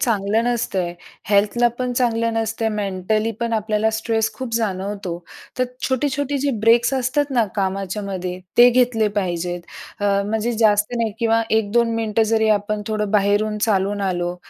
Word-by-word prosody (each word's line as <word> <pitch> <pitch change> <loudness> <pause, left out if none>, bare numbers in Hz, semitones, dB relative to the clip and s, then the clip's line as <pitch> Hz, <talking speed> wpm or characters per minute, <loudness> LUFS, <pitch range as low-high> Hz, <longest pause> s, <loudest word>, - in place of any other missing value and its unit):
चांगलं 220 0 +1
नसतय. 195 -7 -1 0.4
हेल्थला 210 +4 +3
पण 250 -1 -1
चांगलं 230 -2 +1
नसतय, 225 0 -1
मेंटली 210 +2 -1
पण 235 -1 -1
आपल्याला 215 0 +1
स्ट्रेस 225 -1 0
खूप 255 -3 -5
जाणवतो. 195 -4 -2 0.4
तर 255 - +3 0.2
छोटी-छोटी 280 +1 -1
जी 280 +1 0
ब्रेक्स 235 +4 +4
असतात 265 +3 0
ना 240 -4 +2
कामाच्यायामध्ये, 190 -1 -3 0.2
ते 245 +1 +9
घेतले 240 -3 +2
पाहिजेत. 175 -1 -2 0.4
म्हणजे 205 +3 0
जास्त 210 +1 +3
नाही 225 -2 -1
किंवा 230 -1 +2
1-2 225 +2 +2
मिनिटं 225 -1 +1
जरी 220 -1 +3
आपण 210 0 -3
थोडं 210 -2 -2
बाहेरून 210 +1 +1
चालून 205 -1 +1
आलो 175 -2 -1
220 Hz, 140 wpm, -21 LUFS, 200-235 Hz, 0.4 s, ते